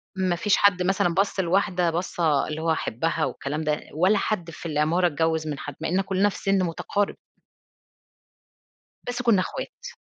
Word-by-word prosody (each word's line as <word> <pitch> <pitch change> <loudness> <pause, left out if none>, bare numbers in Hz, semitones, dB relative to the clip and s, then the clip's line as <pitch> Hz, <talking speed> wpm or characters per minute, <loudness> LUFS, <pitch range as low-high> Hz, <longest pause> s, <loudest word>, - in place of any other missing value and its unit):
ما 185 -2 +1
فيش 205 +3 +2
حد 190 -3 +4
مثلًا 180 -2 +1
بَص 195 +1 0
لواحدة 180 -1 +2
بصّة 165 -4 0
اللي 155 +1 -4
هو 165 - -1
هاحِبها 160 +2 0
والكلام 150 +3 -4
ده 150 -1 0
ولا 185 +7 +3
حد 180 -5 -2
في 170 - -11
العمارة 160 +3 +2
اتجوّز 160 0 0
من 145 -2 -4
حد، 145 - -7
مع 160 - -1
إننا 190 +3 +2
كُلّنا 195 +1 +1
في - - -7
سن 195 -1 +1
مُتقارب. 195 +4 -1 1.9
بس 245 0 -2
كُنّا 225 -6 +4
اخوات. - - -6
175 Hz, 165 wpm, -25 LUFS, 160-195 Hz, 1.9 s, حد